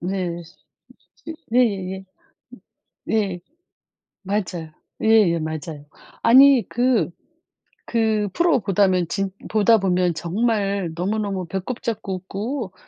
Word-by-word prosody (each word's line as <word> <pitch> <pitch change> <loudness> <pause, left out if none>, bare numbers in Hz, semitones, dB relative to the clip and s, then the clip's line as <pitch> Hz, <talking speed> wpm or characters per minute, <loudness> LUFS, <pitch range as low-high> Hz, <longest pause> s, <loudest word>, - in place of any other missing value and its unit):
네. 175 -2 -3 0.8
그 325 - -6
네네네. 195 -6 0 0.5
음 - - -16 0.5
네. 195 -5 -1 0.8
맞아요. 180 -5 -3 0.3
예예 210 -7 +4
맞아요. 155 -1 -6 0.4
아니 260 -1 +7
그 245 -4 +1 0.8
그 220 -3 +1
프로 340 -7 +2
보다면 190 -3 +2
진 195 +1 -2 0.2
보다 220 +1 +4
보면 180 -2 +1
정말 200 +1 -1
너무너무 195 0 -2
배꼽 195 +7 -4
잡고 210 -4 -3
웃고 200 +4 -5
195 Hz, 190 characters per minute, -22 LUFS, 180-225 Hz, 0.8 s, 아니